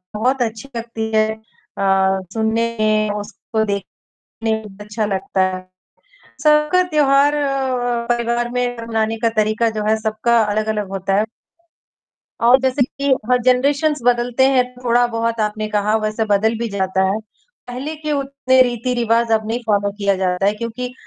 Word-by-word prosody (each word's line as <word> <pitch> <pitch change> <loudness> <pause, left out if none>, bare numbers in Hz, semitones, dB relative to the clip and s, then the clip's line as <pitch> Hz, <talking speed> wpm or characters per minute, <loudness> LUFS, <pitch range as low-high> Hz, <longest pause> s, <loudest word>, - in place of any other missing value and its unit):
बहुत 250 +4 +1
अच्छी 225 +3 -4
लगती 225 -1 -4
है 215 0 +3 0.5
अ, 195 -1 +2
सुनने 225 +1 0
में 215 0 +2
उसको 220 +1 -3
देखने 200 -1 -5 0.5
में 210 -2 -8
अच्छा 210 +1 -3
लगता 190 -1 -1
है। 185 - -11 0.8
सबका 300 +4 +4
त्योहार 290 -2 +4 0.8
परिवार 240 0 0
में 245 0 -2
मनाने 225 0 -1
का 230 +1 +2
तरीका 215 +2 +2
जो 215 -1 -4
है 220 - +4
सबका 220 +2 +1
अलग-अलग 210 -1 -1
होता 195 0 -1
है। 215 - +1 1.2
और 245 +2 +7
जैसे 260 +1 +1
कि 275 +2 -4 0.3
हर 250 - +5
जनरेशंस 280 +4 +2
बदलते 245 +1 +2
हैं, 255 -2 +3 0.2
थोड़ा 240 0 +3
बहुत 230 -1 -2
आपने 215 0 -1
कहा, 210 0 0
वैसे 215 +1 -1
बदल 220 +2 +1
भी 235 0 -2
जाता 190 -1 0
है, 215 - -1 0.5
पहले 255 +5 -5
के 305 0 -4
उतने 275 -2 +1
रीति-रिवाज 235 -1 0
अब 220 -1 +1
नहीं 230 +2 -2
फॉलो 205 -1 +1
किया 200 -1 0
जाता 185 0 0
है। 205 - +3
क्योंकि 235 +3 -5
225 Hz, 150 wpm, -19 LUFS, 210-250 Hz, 1.2 s, और